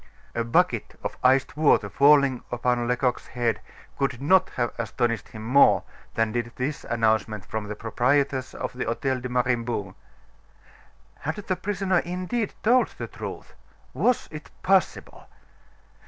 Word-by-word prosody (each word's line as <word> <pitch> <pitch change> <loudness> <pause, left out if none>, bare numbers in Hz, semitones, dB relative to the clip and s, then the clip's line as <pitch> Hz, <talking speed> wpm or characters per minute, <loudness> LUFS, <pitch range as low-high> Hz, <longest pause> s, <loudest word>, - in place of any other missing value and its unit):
A 115 - -1
bucket 115 - +1
of - - -3
iced 130 +1 +3
water 155 -1 +3
falling 140 -3 +4
upon 120 0 0
Lecoq's 125 +1 0
head 120 -2 -1 0.4
could 135 -3 0
not 185 +7 +4
have 120 -1 -1
astonished 115 +1 -1
him 110 -1 -9
more 135 +5 +5 0.3
than 115 -1 +1
did 120 0 -2
this 140 +4 -3
announcement 110 -3 0
from 110 -1 -4
the 105 - -5
proprietress 130 +4 0
of - - -4
the 125 - -3
Hotel 130 +3 -1
de 125 +1 -5
Mariembourg. 120 -5 -1 1.3
Had 155 - -3
the 200 -3 -3
prisoner 190 -1 0
indeed 185 +6 -3
told 245 +3 +4
the - - -4
truth? - - -8 0.4
Was 250 -1 +1
it 155 -1 -9
possible? 190 0 0
125 Hz, 140 wpm, -25 LUFS, 115-155 Hz, 1.3 s, more